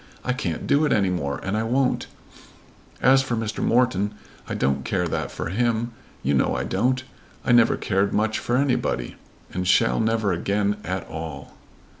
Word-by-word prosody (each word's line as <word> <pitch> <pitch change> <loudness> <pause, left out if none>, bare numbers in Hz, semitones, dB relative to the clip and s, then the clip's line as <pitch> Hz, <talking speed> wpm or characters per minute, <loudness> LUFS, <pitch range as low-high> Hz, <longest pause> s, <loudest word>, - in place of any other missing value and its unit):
"I 125 - +1
can't 85 -10 -3
do 145 +2 +3
it 150 - 0
any 100 -4 +3
more, 70 -6 -2
and 95 +2 -1
I 110 - +1
won't. 125 +3 +1 1.0
As 135 +1 +6
for 130 -3 -2
Mr. 110 -1 -3
Morton, 105 -4 +2 0.3
I - - -2
don't 70 0 0
care 90 -1 0
that - - -2
for - - -5
him. 120 +3 0 0.3
You 70 - +1
know 65 - +2
I - - -1
don't. 125 +6 0 0.4
I - - +2
never 120 -1 +5
cared 100 0 +1
much 110 +1 +1
for 120 - 0
anybody, 125 - 0 0.4
and 90 0 -2
shall 115 +5 +4
never 110 -3 +1
again 100 +4 0
care - - -6
at 95 -1 -3
all." 80 0 -7
105 Hz, 180 wpm, -24 LUFS, 90-120 Hz, 1.0 s, As